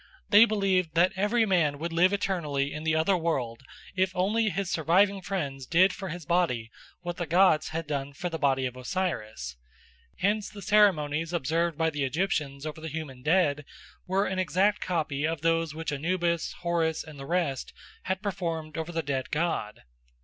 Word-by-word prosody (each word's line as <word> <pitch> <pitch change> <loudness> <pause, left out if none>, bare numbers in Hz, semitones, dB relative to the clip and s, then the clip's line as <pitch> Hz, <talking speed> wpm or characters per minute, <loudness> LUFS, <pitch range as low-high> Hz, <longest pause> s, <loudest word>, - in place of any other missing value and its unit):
They 215 +1 +8
believed 190 -6 +1
that 175 +3 +4
every 210 +4 +2
man 165 -8 +2
would 165 +3 -4
live 175 +3 +4
eternally 155 -9 -1
in 155 - -5
the 160 0 +1
other 160 +5 +3
world 135 -9 -2 0.3
if 185 0 +2
only 215 +4 +2
his 195 +1 -2
surviving 190 +5 +3
friends 140 -9 -4
did 185 +3 +4
for 190 -1 -6
his 165 -1 -6
body 135 -10 0 0.3
what 175 -1 -5
the 175 - -3
gods 175 -1 +4
had 165 +1 -3
done 140 -2 -3
for 175 +5 -4
the 165 -2 -4
body 135 -2 +2
of 125 -1 -4
Osiris. 115 - -3 0.6
Hence 205 +2 0
the 205 -2 -10
ceremonies 165 -6 +3
observed 165 +1 0
by 160 0 +1
the 145 -2 -2
Egyptians 145 -1 -1
over 155 0 -6
the 160 - -5
human 150 -5 -6
dead 150 -1 +2 0.4
were 190 +2 +1
an 190 -2 -2
exact 195 +3 +2
copy 155 -4 -1
of 165 -2 -3
those 165 -1 +1
which 160 -2 -3
Anubis, 170 +3 -1
Horus, 170 -2 0
and 155 -3 -12
the 135 - -7
rest 170 -7 -1 0.3
had 190 +2 -2
performed 165 -5 -3
over 160 +1 -4
the 165 -1 -2
dead 135 -2 -2
god. 150 -9 -2
165 Hz, 180 wpm, -28 LUFS, 150-185 Hz, 0.6 s, They